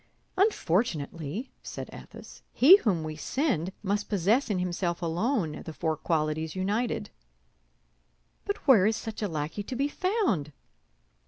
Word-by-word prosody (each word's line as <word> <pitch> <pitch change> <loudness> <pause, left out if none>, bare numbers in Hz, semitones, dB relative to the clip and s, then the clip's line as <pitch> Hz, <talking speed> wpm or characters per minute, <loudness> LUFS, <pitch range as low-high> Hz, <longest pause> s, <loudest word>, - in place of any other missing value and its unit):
"Unfortunately," 185 - 0
said - - -7
Athos, - - -12
"he 320 +10 +9
whom 190 - 0
we 155 0 -5
send 190 - -1
must 205 +1 -1
possess 210 +7 +2
in 205 - 0
himself 175 -1 -1
alone 175 - -1
the 160 - -7
four 160 +1 -1
qualities 155 0 -1
united." 210 +6 -1 1.3
"But 405 -6 -4
where 215 -8 +7
is 220 - +2
such 225 0 -6
a 210 - 0
lackey 155 +3 -3
to 250 +6 -6
be 280 +3 0
found?" 290 - 0
190 Hz, 135 wpm, -28 LUFS, 160-245 Hz, 1.3 s, he